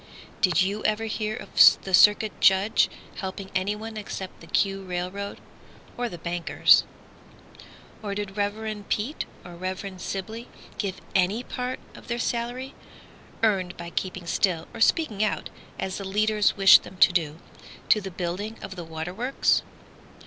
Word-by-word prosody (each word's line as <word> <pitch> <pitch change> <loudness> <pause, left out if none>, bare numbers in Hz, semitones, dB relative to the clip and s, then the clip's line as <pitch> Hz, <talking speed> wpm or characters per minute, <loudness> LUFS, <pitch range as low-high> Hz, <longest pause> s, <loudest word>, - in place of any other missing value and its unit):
Did 180 -3 +4
you 200 +3 -2
ever 215 +1 +1
hear 215 0 -2
of 200 - +6
the 190 - -6
Circuit 210 +3 +6
Judge 195 +3 +4 0.3
Helping 190 0 -6
anyone 210 +4 -2
except 195 -2 -6
the 165 - -12
"Q" 195 +2 +1
railroad, 185 +2 -4 0.6
Or 245 -1 -2
the 175 - -8
bankers? 170 +1 +3 1.2
Or 205 -2 -4
did 205 -1 -4
Rev. 210 +1 -2
Peet 240 +9 -1 0.2
or 175 - -10
Rev. 185 +1 -5
Sibley 220 +5 -5 0.3
Give 195 -3 -3
any 195 +6 +2
part 250 0 -4
of - - -14
their 235 0 -2
salary, 245 +3 -3 0.7
earned 190 -5 +1
by 170 0 -7
keeping 185 -1 -3
still, 170 -1 0
Or - - -8
speaking 220 -6 +2
out 215 - -2 0.3
as 190 +1 -3
the - - -5
leaders 210 +2 +1
wished 195 -1 +8
them 190 - -12
to - - +6
do, 160 -3 0 0.5
To 215 - +5
the 195 - -5
building 185 +5 -4
of 195 -1 -7
the 175 - -6
water 160 +2 -5
works? 245 +7 +1
200 Hz, 150 wpm, -26 LUFS, 185-215 Hz, 1.2 s, wished